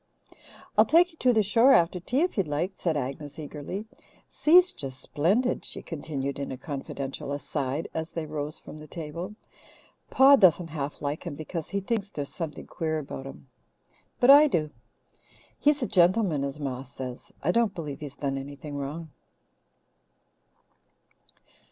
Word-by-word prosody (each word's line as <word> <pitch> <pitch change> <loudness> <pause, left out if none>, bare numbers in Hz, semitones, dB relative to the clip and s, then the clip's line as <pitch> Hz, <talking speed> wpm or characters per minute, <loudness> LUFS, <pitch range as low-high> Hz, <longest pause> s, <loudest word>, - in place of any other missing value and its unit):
"I'll - - +8
take 350 +3 +5
you 325 - -23
to 250 - +4
the 220 -3 +3
shore 230 +6 +5
after 175 +1 +3
tea 245 - 0
if 360 - +1
you'd 195 -6 0
like," 155 +6 -1
said 165 -5 -1
Agnes 140 +2 -5
eagerly. 155 +6 -6 0.4
"Si's 360 +4 +5
just 130 -2 -6
splendid," 195 - +1
she - - -4
continued 140 -4 -4
in 140 - -4
a 130 - -5
confidential 140 0 -5
aside 140 +1 -2
as 160 0 -3
they 165 -2 -4
rose 150 0 -4
from 155 - -11
the 155 - -11
table. 170 +6 -6 0.7
"Pa 275 +1 +7
doesn't 175 - +4
half 145 -2 -5
like 145 +2 -2
him 155 - -4
because 160 +1 -5
he 200 0 -1
thinks 205 -1 -2
there's 145 -7 -5
something 165 -4 -5
queer 160 -1 -2
about 135 -2 -6
him. 135 0 -11 0.7
But 250 +2 +7
I 295 +2 +9
do. 155 - 0 0.9
He's 290 -2 +3
a - - 0
gentleman, 180 -4 +3
as 140 +2 -4
Ma 130 -3 -3
says. 130 -1 -8
I 165 - +3
don't 225 -1 +2
believe 150 -6 -5
he's 145 -3 -8
done 135 -1 -2
anything 145 +1 -7
wrong." 150 +3 -5
155 Hz, 160 wpm, -27 LUFS, 140-195 Hz, 0.9 s, I